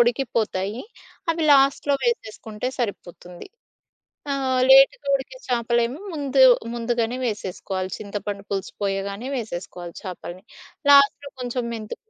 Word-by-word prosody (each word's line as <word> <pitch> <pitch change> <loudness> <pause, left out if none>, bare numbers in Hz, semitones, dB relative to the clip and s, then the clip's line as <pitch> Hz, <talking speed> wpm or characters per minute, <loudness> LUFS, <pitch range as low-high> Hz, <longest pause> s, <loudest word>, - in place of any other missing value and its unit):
ఉడికిపోతాయి 230 -4 0 0.5
అవి 330 0 -1
లాస్ట్‌లో 275 +1 +4
వేసేసుకుంటే 220 - -3
సరిపోతుంది. 180 -6 -6 0.9
ఆ! - - +1 0.4
లేట్‌గా 270 +1 +6
ఉడికే 275 - -6
చేపలేమో 235 +3 0
ముందు 280 -3 +1 0.3
ముందుగానే 235 0 -1
వేసేసుకోవాలి 190 -3 -4
చింతపండు 205 -1 -5
పులుసు 195 -1 -3
పోయగానే 200 +5 -3
వేసేసుకోవాలి 175 -5 -7
చేపల్ని. 185 -1 -8 0.5
లాస్ట్‌లో 280 0 +5
కొంచెం 245 0 -2
మెంతు 215 -2 -6
230 Hz, 100 wpm, -23 LUFS, 200-265 Hz, 0.9 s, లేట్‌గా